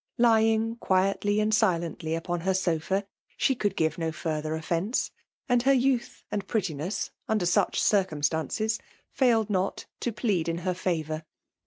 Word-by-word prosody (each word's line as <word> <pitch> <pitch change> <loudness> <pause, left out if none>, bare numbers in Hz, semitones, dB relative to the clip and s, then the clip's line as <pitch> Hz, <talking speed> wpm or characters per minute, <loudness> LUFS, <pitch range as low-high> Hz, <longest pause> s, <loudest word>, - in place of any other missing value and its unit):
Lying 225 -1 +3
quietly 195 +1 +1
and 215 +1 +1
silently 170 -6 +1
on 175 -1 -1
her 190 +2 0
sofa, 190 +2 0 0.3
she 270 - +3
could 210 -5 -1
give 160 +1 0
no 165 -1 -1
further 155 -1 -2
offence; 170 +8 -1 0.4
and 245 -2 +3
her 275 +3 +4
youth 255 -2 +1
and 205 - -2
prettiness, 180 - -2 0.2
under 215 -5 +1
such 175 - +2
circumstances, 185 +3 +1 0.3
failed 230 -5 +2
not 190 0 -1
to 240 - -1
plead 205 -7 0
in 165 - -1
her 185 - +1
favour. 160 -3 -2
190 Hz, 145 wpm, -27 LUFS, 165-220 Hz, 0.4 s, her